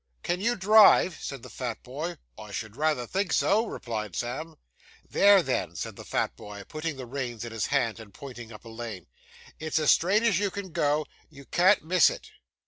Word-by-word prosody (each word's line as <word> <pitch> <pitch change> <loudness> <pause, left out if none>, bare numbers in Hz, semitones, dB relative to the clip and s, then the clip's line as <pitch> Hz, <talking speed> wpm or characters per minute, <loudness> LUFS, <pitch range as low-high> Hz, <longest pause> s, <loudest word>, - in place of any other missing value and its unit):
'Can 175 +1 -1
you 235 +3 +1
drive?' 200 -3 +6
said 135 -4 -6
the - - -9
fat 120 -3 -5
boy. 155 +7 -5 0.2
'I 105 -1 -10
should 110 +2 -5
rayther 150 -4 0
think 190 +5 -2
so,' 220 +3 +2
replied 105 - -5
Sam. 155 +7 -4 0.5
'There, 200 -2 +5
then,' 95 - -2
said - - -5
the - - -10
fat - - -1
boy, 105 -1 -9
putting 155 -1 -4
the 130 - -6
reins 120 -3 -5
in 120 - -7
his 115 -3 -2
hand, 125 -6 0
and 110 -3 -12
pointing 120 0 -10
up 105 +1 -12
a - - -9
lane, 110 -6 -7 0.5
'it's 155 0 -2
as 155 -2 +4
straight 200 +6 +3
as 210 -6 +3
you 205 -1 +1
can 195 -1 -7
go; 150 0 +1 0.2
you 140 -3 -14
can't 180 +5 +4
miss 180 0 +5
it. - - -9
140 Hz, 200 wpm, -27 LUFS, 115-180 Hz, 0.5 s, drive